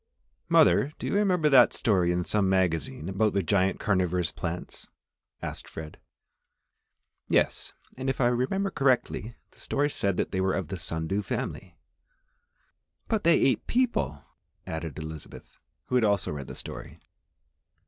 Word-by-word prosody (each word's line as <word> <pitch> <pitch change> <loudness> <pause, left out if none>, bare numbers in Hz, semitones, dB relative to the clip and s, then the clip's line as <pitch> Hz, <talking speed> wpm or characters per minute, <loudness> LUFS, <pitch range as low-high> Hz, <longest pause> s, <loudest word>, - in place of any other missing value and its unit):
"Mother, 145 - +4
do - - -6
you - - -1
remember 185 -6 +3
that 135 -4 +6
story 90 -6 +2
in 90 0 0
some 100 +1 +1
magazine 85 -4 0
about 100 +3 +1
the 100 - +1
giant 95 +3 +1
carnivorous 90 -4 +1
plants?" 85 0 -6 0.6
asked - - -5
Fred. 80 -1 -9 1.3
"Yes, - - +1 0.2
and 130 +1 -2
if 135 - -2
I 125 - +3
remember 130 +12 +1
correctly, 125 -4 0 0.2
the - - -22
story 145 +1 0
said 100 -7 0
they 95 - -1
were 95 0 +1
of 90 -6 -3
the 95 - -4
sun 80 -1 -3
dew 95 +5 -1
family." 95 - -5 1.3
"But 220 -2 0
they 170 0 +5
ate 130 -5 +2
people!" 235 - 0 0.4
added 80 -3 -5
Elizabeth, 80 -1 -9 0.3
who - - -8
had 125 -2 +4
also 100 -3 +1
read 70 -3 -6
the - - -8
story. - - -9
100 Hz, 150 wpm, -27 LUFS, 85-130 Hz, 1.3 s, that